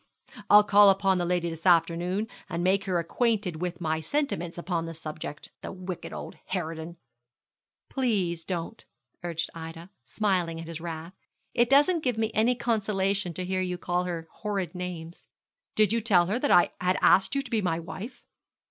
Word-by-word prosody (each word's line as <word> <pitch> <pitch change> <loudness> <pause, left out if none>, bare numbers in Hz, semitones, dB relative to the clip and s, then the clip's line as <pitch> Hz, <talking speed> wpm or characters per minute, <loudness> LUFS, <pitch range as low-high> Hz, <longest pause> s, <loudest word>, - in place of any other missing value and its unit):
I'll 210 0 +9
call 205 0 +7
upon 195 -1 +3
the 175 - 0
lady 175 -1 +1
this 165 +3 -4
afternoon, 175 +4 +3 0.2
and 170 +1 -2
make 195 +2 +2
her 185 -3 0
acquainted 185 -1 0
with 180 -1 -3
my 160 -2 -1
sentiments 175 - -2
upon 170 -1 -2
the 165 - -6
subject. 155 -1 -7
The - - -6
wicked 185 -2 -6
old - - -7 0.2
harridan.' 165 -1 -4 0.9
'Please 195 -11 0
don't,' 180 +5 -4 0.4
urged 165 -1 -3
Ida, 165 +2 -8
smiling 180 -6 0
at 165 - -7
his 165 -1 -6
wrath; 165 +1 -6 0.4
'it 240 0 +3
doesn't 300 +5 +4
give 245 -4 0
me 220 -1 0
any 230 +3 +3
consolation 205 -5 0
to 185 - -3
hear 185 0 -1
you 180 -1 -2
call 175 0 -1
her 170 -2 -4
horrid 195 -6 -2
names.' 175 -2 -7 0.5
'Did 215 0 +4
you 230 - +1
tell 190 -6 +4
her 205 +7 -1
that 285 - 0
I 175 - +6
had 180 +1 +2
asked 190 +8 +4
you 275 - +1
to 255 - -11
be 225 -2 +2
my 170 -4 0
wife?' 195 +8 -8
180 Hz, 175 wpm, -27 LUFS, 170-210 Hz, 0.9 s, I'll